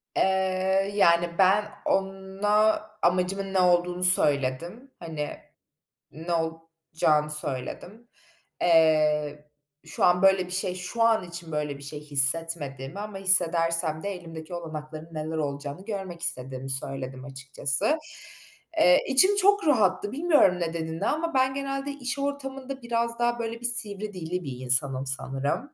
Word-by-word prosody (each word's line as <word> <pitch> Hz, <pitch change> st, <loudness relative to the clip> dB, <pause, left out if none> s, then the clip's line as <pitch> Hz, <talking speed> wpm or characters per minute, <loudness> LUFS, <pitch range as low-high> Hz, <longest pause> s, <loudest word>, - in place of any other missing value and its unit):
Eee, 190 Hz, +1 st, 0 dB
yani, 170 Hz, -3 st, +2 dB
ben 195 Hz, +2 st, +3 dB, 0.2 s
ona 195 Hz, +3 st, 0 dB, 0.2 s
amacımın 185 Hz, +2 st, -1 dB
ne 190 Hz, -, +1 dB
olduğunu 180 Hz, 0 st, +1 dB
söyledim. 170 Hz, -, +3 dB
Hani 155 Hz, -3 st, -6 dB, 0.8 s
ne 165 Hz, +3 st, -6 dB
olacağını 160 Hz, -2 st, -2 dB
söyledim. 150 Hz, -, +4 dB, 0.5 s
Eee, 150 Hz, -3 st, +1 dB, 0.4 s
şu -, -, -5 dB
an 180 Hz, +1 st, +2 dB
böyle 190 Hz, -1 st, +3 dB
bir -, -, -11 dB
şey 185 Hz, -1 st, -2 dB
şu 205 Hz, +6 st, -3 dB
an 225 Hz, -4 st, +2 dB
için 170 Hz, -1 st, -9 dB
böyle 150 Hz, -2 st, -4 dB
bir 140 Hz, -, -13 dB
şey 145 Hz, +1 st, -8 dB
hissetmediğimi 145 Hz, +1 st, -1 dB
ama 210 Hz, -2 st, -7 dB
hissedersem 165 Hz, -4 st, +3 dB
de 200 Hz, -, -3 dB
elimdeki 165 Hz, -1 st, -11 dB
olanakların 155 Hz, -1 st, -8 dB
neler 155 Hz, +1 st, -5 dB
olacağını 145 Hz, +4 st, -6 dB
görmek 190 Hz, -5 st, -7 dB
istediğimi 130 Hz, -3 st, -3 dB
söyledim 130 Hz, 0 st, +1 dB
açıkçası. 140 Hz, -, 0 dB, 0.8 s
Eee, 180 Hz, 0 st, +4 dB
içim 375 Hz, +10 st, +5 dB
çok 405 Hz, -2 st, +2 dB
rahattı, 205 Hz, -6 st, +1 dB
bilmiyorum 290 Hz, -, +2 dB
nedenini 165 Hz, -1 st, -4 dB
ama 330 Hz, +2 st, -2 dB
ben 260 Hz, 0 st, +1 dB
genelde 275 Hz, 0 st, -5 dB
iş 270 Hz, -1 st, -5 dB
ortamında 270 Hz, -1 st, -6 dB
biraz 235 Hz, 0 st, -3 dB
daha 240 Hz, 0 st, -1 dB
böyle 230 Hz, 0 st, -5 dB
bir -, -, -5 dB
sivri 210 Hz, -3 st, 0 dB
dilli 180 Hz, 0 st, -5 dB
bir 130 Hz, -3 st, -7 dB
insanım 130 Hz, +1 st, 0 dB
sanırım. 135 Hz, -, -3 dB
175 Hz, 130 wpm, -25 LUFS, 150-210 Hz, 0.8 s, içim